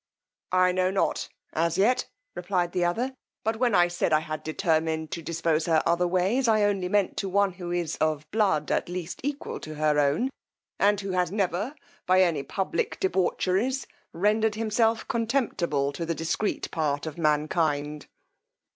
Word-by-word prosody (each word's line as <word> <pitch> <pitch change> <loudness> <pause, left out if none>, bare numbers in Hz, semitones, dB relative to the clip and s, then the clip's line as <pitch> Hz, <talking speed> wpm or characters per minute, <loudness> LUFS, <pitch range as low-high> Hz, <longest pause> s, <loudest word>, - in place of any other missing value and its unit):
I 185 0 +5
know 185 0 +1
not 190 0 0 0.2
as 165 +1 0
yet, 245 +6 +3 0.3
replied 180 -3 -1
the 180 - 0
other, 235 +10 0 0.3
but 220 +1 0
when 240 -3 +2
I 175 0 +5
said 175 -1 -1
I 155 0 +4
had 155 0 -5
determined 160 -1 0
to 170 - -4
dispose 165 0 0
her 160 -2 +3
otherways, 180 +8 +2
I 215 -2 +4
only 195 -3 +1
meant 205 -1 +1
to 195 - -2
one 200 +1 +2
who 175 -1 -7
is 175 -2 -2
of 155 -1 0
blood 200 -8 +1
at - - 0
least 175 -2 -5
equal 285 +1 -3
to 155 0 -8
her 150 0 +2
own, 145 - +2 0.5
and 205 0 +3
who 195 -1 -4
has 180 -1 +1
never, 200 - -1 0.3
by 185 +1 +5
any 165 -5 +1
public 335 - -2
debaucheries, 235 - 0 0.3
rendered 210 +4 +1
himself 225 +1 +1
contemptible 220 - 0
to 140 +4 -5
the 165 0 -2
discreet 165 +6 -2
part 150 -3 -1
of 155 +1 -6
mankind. 150 -1 0
180 Hz, 165 wpm, -27 LUFS, 160-210 Hz, 0.5 s, I